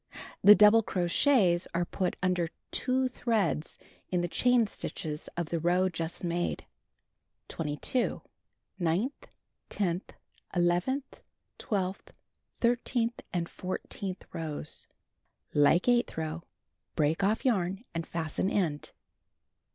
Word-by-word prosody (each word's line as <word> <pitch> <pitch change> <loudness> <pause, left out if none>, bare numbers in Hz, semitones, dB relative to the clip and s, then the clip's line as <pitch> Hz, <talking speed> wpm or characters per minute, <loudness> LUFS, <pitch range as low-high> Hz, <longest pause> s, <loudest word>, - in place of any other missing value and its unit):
The 205 +1 +10
double 210 +2 +7
crochets 180 0 +2
are 175 +1 +1
put 185 +1 -2
imder 180 -2 +1 0.2
two 260 0 +1
threads 205 - -1 0.3
in 180 -1 +1
the 175 - 0
chain 245 +5 +3
stitches 155 -6 -5
of 170 -2 -2
the 170 - -1
row 180 +3 +2
just 165 0 -4
made. 175 0 -1 0.8
22. 155 - -1 0.6
Ninth, 180 - -1 0.4
tenth, 180 -2 -2 0.4
eleventh, 175 +11 0 0.4
twelfth, 195 -4 -3 0.5
thirteenth 240 0 +1
and 170 -2 -1
fourteenth 185 +1 -5
rows: 155 -2 -3 0.7
Like 150 +7 +4
eighth 245 -5 +2
row. 160 +1 -3 0.6
lirc^ak 155 +4 +2
off 215 +7 +1
yarn 195 -4 +1
and 165 -1 -3
fasten 165 +3 -1
end. 160 -8 -1
180 Hz, 105 wpm, -30 LUFS, 165-220 Hz, 0.8 s, The